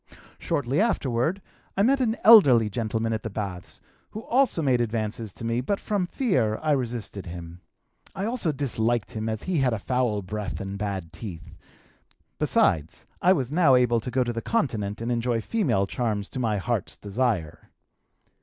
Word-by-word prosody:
"Shortly 140 +5 0
afterward 160 - 0 0.3
I 195 - +4
met 270 +4 +3
an 230 -2 +1
elderly 130 - +7
gentleman 115 0 -1
at 110 - -2
the 110 - -5
baths 100 -4 -6 0.3
who 215 - -7
also 250 -10 +2
made 130 -3 +3
advances 110 -1 -3
to 115 - -8
me, 115 +1 0
but 200 +10 -1
from 200 -4 -1
fear 130 - +1
I 155 - +2
resisted 120 -8 -3
him. 85 0 -8 0.5
I 195 - -2
also 225 -8 0
disliked 120 -5 -1
him 110 0 -3
as 110 -1 -4
he 185 -4 0
had 130 -3 +2
a - - 0
foul 115 -2 -1
breath 105 +2 -4
and 100 0 -5
bad 100 -5 -4
teeth; 90 -8 -9 0.8
besides 80 0 +1 0.2
I 180 +2 +6
was 135 -7 -2
now 155 -5 +5
able 120 -2 +3
to 115 - -5
go 130 +1 +1
to 120 -1 -3
the 115 - -3
Continent 110 - -1
and 115 +1 -2
enjoy 120 0 0
female 120 - 0
charms 105 -1 -2
to 130 - -6
my 110 -4 0
heart's 110 0 -2
desire. 100 -6 -2
120 Hz, 175 wpm, -25 LUFS, 105-145 Hz, 0.8 s, elderly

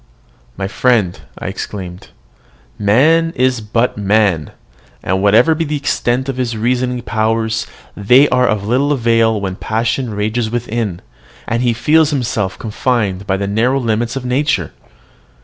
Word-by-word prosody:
"My 95 - -2
friend!" 105 -4 +1 0.2
I - - -8
exclaimed, 90 -3 -6 0.7
"man 155 +11 +3
is 130 -1 +1
but 115 +1 -1
man; 100 -6 +1 0.5
and, 95 +1 0
whatever 110 +9 +5
be 160 +1 -1
the 150 -1 -3
extent 130 -2 -1
of 135 -2 -3
his 120 -3 -2
reasoning 125 +2 -1
powers, 110 0 -1 0.3
they 125 +8 +5
are 125 0 +2
of 105 -2 -1
little 130 +6 +1
avail 115 -3 +2
when 95 -2 -4
passion 115 +2 -1
rages 110 +2 -1
within, 115 -5 -3 0.5
and 115 +1 -1
he 120 -2 +2
feels 155 +6 +3
himself 115 -9 -2
confined 105 -4 -2
by 95 - +1
the 100 - -2
narrow 115 +7 +1
limits 115 0 -1
of 135 -2 -4
nature. 125 - 0
115 Hz, 145 wpm, -16 LUFS, 105-125 Hz, 0.7 s, whatever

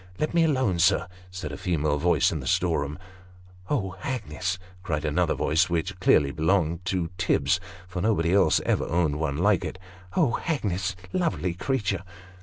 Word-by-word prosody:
" 90 - -22
Let 155 - -1
me 170 -1 +4
alone, 130 - +1
sir," 85 +2 +3 0.2
said 90 -5 -6
a - - -6
female 75 -4 0
voice 85 +3 +3
in - - -2
the - - -6
storeroom. 75 -4 0 0.4
" 90 0 -23
Oh, 95 -10 -1
Hagnes! 95 - -3
" 90 0 -23
cried 80 -4 -2
another 75 - +1
voice, 85 +4 +2
which 90 +3 -2
clearly 75 -6 +4
belonged 85 +2 +1
to 90 -2 -1
Tibbs, 85 -2 +2 0.3
for 90 -1 -4
nobody 90 -5 +2
else 100 - +4
ever - - +1
owned 80 -3 +1
one 75 -3 -1
like 100 +4 +3
it. - - -5 0.2
" 95 0 -14
Oh, 150 -10 +2
Hagnes 100 - -1 0.2
lovely 160 - 0
creature 100 -1 -1
90 Hz, 180 wpm, -26 LUFS, 80-100 Hz, 0.4 s, me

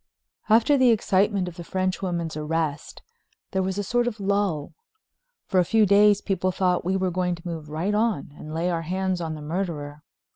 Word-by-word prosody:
X - - -6
After 235 +6 +4
the 255 -1 +5
excitement 200 -3 +2
of 175 - -8
the 175 - -6
French 185 +1 -2
woman's 170 -4 -2
arrest 155 -1 -3 0.5
there 190 - 0
was 190 +1 -2
a 205 - -1
sort 240 +3 +1
of 225 -3 -3
lull. 195 -7 -1 0.7
For 185 - +1
a - - +5
few 215 +5 +3
days 205 +1 +5
people 185 -2 0
thought 180 -1 +1
we 185 +2 0
were 185 -1 0
going 180 0 0
to 170 +1 -11
move 160 -3 -6
right 165 +7 -1
on 210 -10 0
and 155 - -9
lay 170 +3 -1
our 165 -1 -1
hands 185 +2 -2
on 160 -1 -3
the 150 - -8
murderer. 150 -3 -4
185 Hz, 205 wpm, -25 LUFS, 165-200 Hz, 0.7 s, the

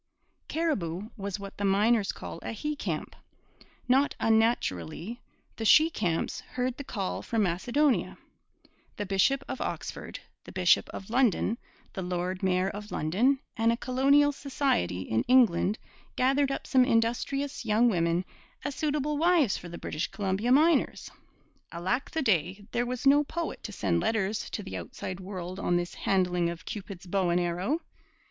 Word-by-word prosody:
Cariboo 210 - -2
was 200 -3 -4
what 200 0 -8
the 205 - -4
miners 205 +2 +3
call - - -8
a - - -5
'he 300 +7 -3
camp.' - - -4 0.7
Not 265 +3 +3
unnaturally, 220 - 0 0.4
the 225 - -4
'she 310 +9 +6
camps' 175 - -1
heard 250 0 -3
'the 285 - -6
call 195 -7 -3
from 225 -2 0
Macedonia.' 240 - +1 0.8
The 205 - -2
bishop 200 +8 +2
of - - -5
Oxford, - - -5 0.2
the - - -11
bishop 185 -2 +3
of 195 +2 -8
London, 235 -2 +2 0.3
the 190 - -4
lord 180 +1 -2
mayor 185 -1 +2
of 210 +1 -8
London, 215 - +2 0.2
and 230 -1 +3
a 230 - 0
colonial 275 +4 +3
society 270 - -1
in 110 +4 0
England 220 -5 +4 0.4
gathered 275 +2 +2
up 275 - -3
some 260 -2 +4
industrious 255 +4 0
young 225 +2 +3
women 170 -3 +1 0.4
as 290 - -2
suitable 295 0 -1
wives 330 - +4
for 175 - -7
the 170 - -7
British 155 - -3
Columbia 200 +4 -1
miners. 305 +2 +3 0.6
Alack 185 +10 -1
the 320 - -2
day, 190 - +1
there 240 0 0
was 250 +1 -4
no 285 +2 +6
poet 330 +3 -4
to 215 - -6
send 85 - 0
letters 210 - -1
to 210 - -5
the 195 - -6
outside 185 0 -6
world 185 -1 -6
on 175 -3 +1
this 175 0 -3
handling 180 -3 +1
of 170 -1 -7
Cupid's 195 -4 -7
bow 185 0 0
and 170 +1 +2
arrow! 180 - -1
215 Hz, 155 wpm, -28 LUFS, 185-265 Hz, 0.8 s, she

